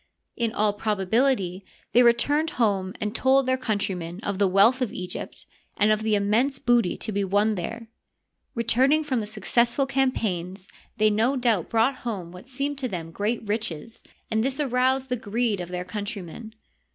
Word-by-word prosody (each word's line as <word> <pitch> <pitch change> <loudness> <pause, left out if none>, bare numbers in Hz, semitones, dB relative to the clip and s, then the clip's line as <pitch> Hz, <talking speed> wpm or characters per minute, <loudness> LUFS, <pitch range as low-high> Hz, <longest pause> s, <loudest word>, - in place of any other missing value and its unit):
In 230 -2 -1
all 210 -2 +1
probability 205 -1 0 0.3
they 245 - +6
returned 285 +7 +3
home 195 -5 +1
and 210 0 -2
told 265 +2 +3
their 260 0 +2
coun 230 -5 -1
trymen 180 -3 -4
of 200 -1 -3
the 200 - +4
wealth 205 +8 +4
of 250 - 0
Egypt 180 0 -6 0.3
and 210 +1 +4
of 215 0 +2
the 220 -1 +1
immense 220 +7 +1
booty 240 -6 +2
to 220 - -4
be 200 -1 0
won 205 +3 +2
there. 225 +5 -5 0.7
Returning 260 +6 +3
from 260 -6 -1
successful 235 +5 +1
campaigns 200 -9 -1 0.3
they 215 -1 +4
no 225 +6 +2
doubt 235 -9 +1
brought 230 +4 +2
home 195 -8 -5
what 180 +7 -12
seemed 275 +2 -3
to 260 - -1
them 170 -6 -5
great 215 +4 -2
riches, 215 -2 -4 0.3
and 220 0 +1
this 270 +3 -1
aroused 260 -1 +1
the 250 - +1
greed 225 -1 -1
of 175 - -6
their 180 0 -4
countrymen. 205 +2 -6
220 Hz, 170 wpm, -25 LUFS, 200-250 Hz, 0.7 s, they